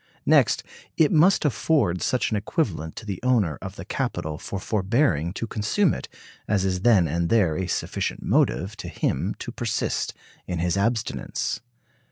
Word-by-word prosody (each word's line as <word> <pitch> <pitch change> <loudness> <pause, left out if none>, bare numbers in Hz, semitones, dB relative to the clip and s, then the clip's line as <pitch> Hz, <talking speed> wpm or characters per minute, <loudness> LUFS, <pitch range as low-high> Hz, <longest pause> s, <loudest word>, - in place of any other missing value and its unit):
Next, - - +4 0.3
it 155 -3 +4
must 170 +2 +4
afford 140 - +1
such 125 - 0
an - - +1
equivalent 100 - -2
to 110 - -8
the 100 -4 -4
owner 110 - +2
of - - -7
the - - -8
capital 75 0 -3
for 100 - -5
forbearing 95 - +1
to 115 - -3
consume 115 - +1
it - - -6 0.4
as 100 -2 +1
is 90 -1 0
then 100 -6 +5
and 85 +3 -1
there 95 -9 +3
a 95 +1 -2
sufficient - - -2
motive 100 +5 +1
to 100 - -7
him 85 - -1
to - - -6
persist - - -2 0.3
in 90 - -2
his 85 +1 0
abstinence. 110 +3 -1
100 Hz, 165 wpm, -25 LUFS, 85-120 Hz, 0.4 s, then